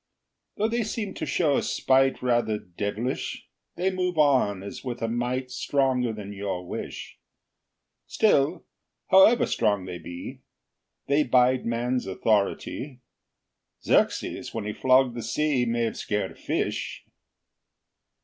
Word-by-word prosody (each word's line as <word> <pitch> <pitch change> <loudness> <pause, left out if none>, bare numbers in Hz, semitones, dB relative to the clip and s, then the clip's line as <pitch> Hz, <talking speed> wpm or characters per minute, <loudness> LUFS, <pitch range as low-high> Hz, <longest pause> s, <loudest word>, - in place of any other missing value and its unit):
Though 215 - +2
they 235 +1 0
seem 215 -2 -3
to - - -5
show 150 -5 +2
a - - +1
spite 135 0 +2
Rather 120 -3 +1
devilish, 105 +6 -4 0.3
They 185 +2 0
move 180 -2 -2
on 130 -10 +3
as 100 - -8
with 125 -2 -4
a - - +1
might 125 +2 -2
Stronger 130 -2 +1
than 105 -2 -7
your 95 -3 -4
wish. - - -7 0.9
Still, 165 -6 +2 0.5
however 190 +5 +7
strong 105 -4 0
they 90 -1 -6
be, 85 +2 -8 0.7
They 140 +2 +3
bide 125 -2 +3
man's 120 0 -1
authority: 110 +6 -1 0.8
Xerxes, - - 0
when 110 -2 -3
he 105 - -3
flogged 130 0 +3
the 120 - -5
sea, 125 +3 0
May've 115 -1 -1
scared 105 -3 -2
a - - -14
fish. - - -3
125 Hz, 130 wpm, -26 LUFS, 105-140 Hz, 0.9 s, however